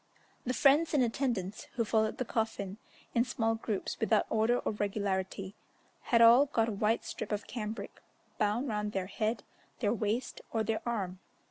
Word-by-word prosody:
The 255 - 0
friends 300 +6 +4
and 270 - +5
attendants, 230 -5 -1
who 230 - +1
followed 220 0 +1
the 255 - -2
coffin 215 -4 -2 0.4
in 235 - +4
small 225 -2 0
groups 220 -3 -3
without 220 -1 +3
order 225 +2 +3
or - - -1
regularity, 195 -2 -2 0.5
had 230 -1 +5
all 240 +5 +8
got 230 -5 +1
a - - -1
white 215 +3 +1
strip - - -5
of 205 -1 -2
cambric 220 -1 -6 0.4
bound 215 +6 +1
round 210 -2 -2
their 190 -1 -1
head, 215 +3 -2 0.4
their 210 -2 +2
waist, 225 +3 -2
or 225 -1 +1
their 220 0 -1
arm. 190 -6 -2
220 Hz, 165 wpm, -32 LUFS, 205-235 Hz, 0.5 s, all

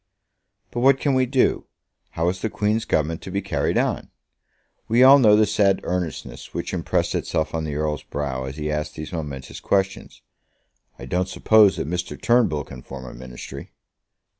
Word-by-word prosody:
"But 120 - -3
what 135 +2 +4
can 140 - +1
we 130 -1 +2
do? 130 0 +1 0.5
How 80 +1 0
is 90 0 -4
the 110 - -1
Queen's 105 +2 0
Government 80 -3 0
to - - -8
be 100 +2 -1
carried 100 - -1
on?" - - -1 0.8
We 120 +3 +4
all 135 +2 +9
know 105 -5 +6
the 110 0 +5
sad 100 -2 +2
earnestness 90 -2 -4
which - - -4
impressed - - 0
itself 80 0 -1
on 80 -1 -2
the 75 -2 -4
Earl's 75 -1 -1
brow 70 -3 -4
as 65 +2 -7
he 75 0 -2
asked 75 0 -3
these 80 +3 -7
momentous 70 -5 -6
questions. 95 -1 -2 0.7
"I - - -9
don't 90 +1 -1
suppose 110 -1 +5
that - - -3
Mr. 90 +2 -4
Turnbull 115 - +2
can 65 - -11
form 65 0 -9
a 65 - -9
Ministry." 65 +2 -9
90 Hz, 180 wpm, -23 LUFS, 75-110 Hz, 0.8 s, all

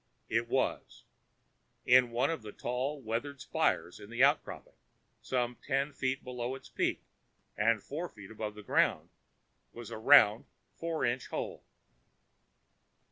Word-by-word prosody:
It 115 +1 +1
was. 130 +2 -1 0.8
In 125 -1 +6
one 125 +6 +1
of 165 - -3
the 105 -1 -8
tall, 130 +7 -3
weathered 130 +4 -4
spires 90 -7 0
in 100 - -11
the 120 +3 +1
outcropping, 145 +2 +1 0.5
some 125 -2 -1
ten 140 +1 -1
feet 130 0 -2
below 125 0 -4
its - - -12
peak - - -1 0.5
and 110 0 +2
four 165 +5 -5
feet 100 -1 -13
above 105 -1 -5
the 105 - -10
ground, - - +1 0.6
was 120 -2 -9
a - - -5
round 115 -3 +6 0.3
four 165 -1 -2
inch 120 +2 -1
hole. - - -5
125 Hz, 135 wpm, -32 LUFS, 115-135 Hz, 0.8 s, In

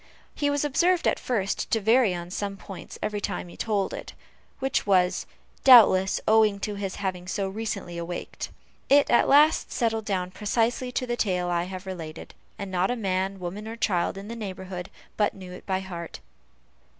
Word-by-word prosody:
He 290 - 0
was 285 0 0
observed, 340 +5 +2
at - - +1
first, 200 -6 -1
to 225 - +2
vary 225 +1 +4
on 175 0 -7
some 200 +1 -3
points 195 0 -9
every 210 -1 -2
time 180 - -3
he - - -12
told 205 -3 -1
it, - - -7 0.4
which 270 -5 -1
was, 185 -2 +2 0.4
doubtless, 210 -7 +7
owing 215 -2 +4
to 210 - -2
his 200 -2 -4
having 185 -2 -4
so 195 +1 -1
recently 195 -4 -4
awaked. 175 +1 -5 0.4
It 285 +1 +5
at 240 - +4
last 300 +3 +5
settled 225 -3 0
down 185 -3 -1
precisely 230 +5 0
to 255 - -1
the 240 -1 -1
tale 180 -6 0
I 175 0 0
have 185 +1 -7
related, 170 -5 -7 0.2
and 200 -2 -6
not 185 0 +1
a 245 - 0
man, 195 -3 -1
woman, 190 +4 -6
or 225 - -5
child 190 -5 0
in 200 +1 -8
the 230 - -6
neighborhood, 190 -4 -6 0.3
but 210 -1 +1
knew 185 -2 -10
it 180 - -11
by 190 -1 0
heart. 170 -3 -7
200 Hz, 185 wpm, -26 LUFS, 185-225 Hz, 0.4 s, doubtless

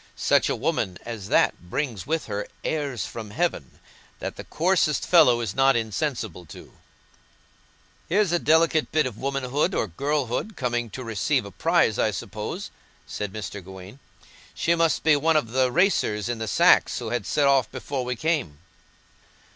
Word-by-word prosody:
Such - - +2
a - - 0
woman 90 -1 -1
as 115 -5 -6
that 90 - +1
brings 115 -6 -3
with 160 0 -1
her 100 0 -4 0.2
'airs 145 -7 -2
from 110 -2 -7
heaven' 160 - -2 0.4
that - - -5
the - - -8
coarsest 165 -4 +1
fellow 145 -9 +5
is 110 -4 -3
not 135 0 +4
insensible 110 - -2
to." - - -12 1.4
"Here's 195 +1 +2
a 175 - +2
delicate 160 0 +3
bit 155 -2 +2
of 120 -4 -5
womanhood, 140 +5 -1
or - - +1
girlhood, 140 - -2
coming 120 -4 -2
to 130 - -7
receive 110 -7 0
a - - -9
prize, - - +2
I - - +3
suppose," - - -5 0.3
said 105 -2 -5
Mr. 100 -2 -6
Gawaine. 95 +6 -11 0.6
"She 170 - +1
must 165 -1 +1
be 155 -1 +5
one 155 +2 +2
of 115 -7 -1
the 130 0 +2
racers 120 - +1
in 120 -2 -3
the 110 - -3
sacks, - - +4
who - - -4
had 120 -4 -2
set 145 - +2
off 135 -4 +3
before 135 -3 -4
we 125 0 -3
came." 150 - -1
130 Hz, 165 wpm, -25 LUFS, 110-155 Hz, 1.4 s, fellow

